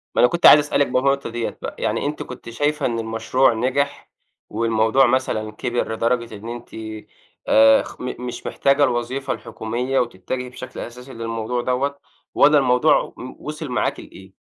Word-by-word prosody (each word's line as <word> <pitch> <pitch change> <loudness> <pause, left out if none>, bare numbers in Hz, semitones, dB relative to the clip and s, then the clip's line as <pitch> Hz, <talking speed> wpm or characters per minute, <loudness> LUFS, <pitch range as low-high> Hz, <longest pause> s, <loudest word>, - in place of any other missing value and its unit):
ما - - +4
أنا 125 - +6
كُنت 175 - 0
عايز 150 - +10
أسألِك 145 -1 +1
بالنقطة 135 +1 +1
ديّة 120 0 -4
بقى، - - -5
يعني - - -1
أنتِ 150 +1 -3
كُنتِ 125 -2 -10
شايفة 145 +4 -1
إن 115 -2 -1
المشروع 115 +3 +1
نِجح، 130 +5 -1 0.4
والموضوع 115 +3 +2
مثلًا 120 -4 0
كِبر 120 0 -2
لدرجة 115 0 -1
إن 110 +3 -8
أنتِ 120 0 -8 0.8
آآ 110 0 +6
خ - - -11
م 125 0 -4
مش 120 - -7
محتاجة 140 +1 +2
الوظيفة 125 +1 -1
الحكومية 120 +4 -3
وتتجهي 125 +3 -3
بشكل 125 - -9
أساسي 125 +2 -9
للموضوع 115 +1 -3
دوّة، 140 +3 -1 0.3
والّا 150 0 +5
الموضوع 130 +2 +3
م 130 - -8
وصِل 155 0 -6
معاكِ 125 - -1
لإيه؟ 95 0 -13
125 Hz, 160 wpm, -21 LUFS, 115-135 Hz, 0.8 s, عايز